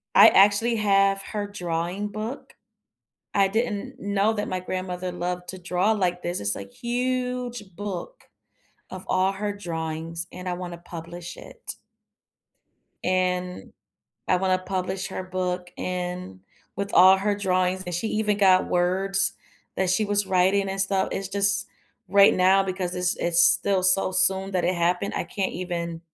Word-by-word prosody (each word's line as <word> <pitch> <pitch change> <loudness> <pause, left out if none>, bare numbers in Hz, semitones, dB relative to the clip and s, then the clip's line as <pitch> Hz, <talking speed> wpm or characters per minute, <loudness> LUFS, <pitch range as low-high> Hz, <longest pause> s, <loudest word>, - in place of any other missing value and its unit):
I - - +10
actually 205 +4 +4
have 195 -1 +3
her 205 -2 -4
drawing 180 +1 -3
book. 215 +6 -6 0.8
I 195 -1 +4
didn't 220 -1 -2
know 200 +2 +1
that 205 -1 -3
my 185 0 -2
grandmother 185 0 -4
loved 180 0 -4
to 185 - -6
draw 180 +4 +1
like 180 -4 -1
this. 175 +1 -2
It's 100 0 0
a - - -5
huge 250 - -2
book 205 - -6 0.7
of 185 0 -8
all 185 +1 +2
her 205 +1 -3
drawings, 165 -2 -5
and 180 0 -6
I - - -1
wanna 175 -1 -6
publish 170 +1 -9
it - - -9 1.3
and 180 0 -1 0.6
I 185 - +4
wanna 185 0 +1
publish 185 +1 -3
her 190 - -5
book, 180 -1 -3
and 180 - -4 0.4
with 200 0 -3
all 190 +1 +8
her 205 +1 0
drawings 185 -1 0
and 175 - -4
she 220 +6 -1
even 210 -1 0
got 190 -2 +4
words 190 +2 +1 0.4
that 190 -1 0
she 210 +4 +2
was 205 -1 0
writing 190 +1 +2
and 195 0 -3
stuff. 195 -1 +1
It's 195 -1 -3
just 200 +1 +1 0.4
right 200 0 +6
now, 190 +1 +4
because 185 -1 -3
it's 180 0 0
it's 170 0 +2
still 195 -2 +4
so 185 +1 +4
soon 190 +1 +3
that 180 -2 0
it 180 +1 +1
happened, 180 +3 0
I - - -1
can't 195 -2 -3
even 170 -2 -4
185 Hz, 155 wpm, -25 LUFS, 180-200 Hz, 1.3 s, I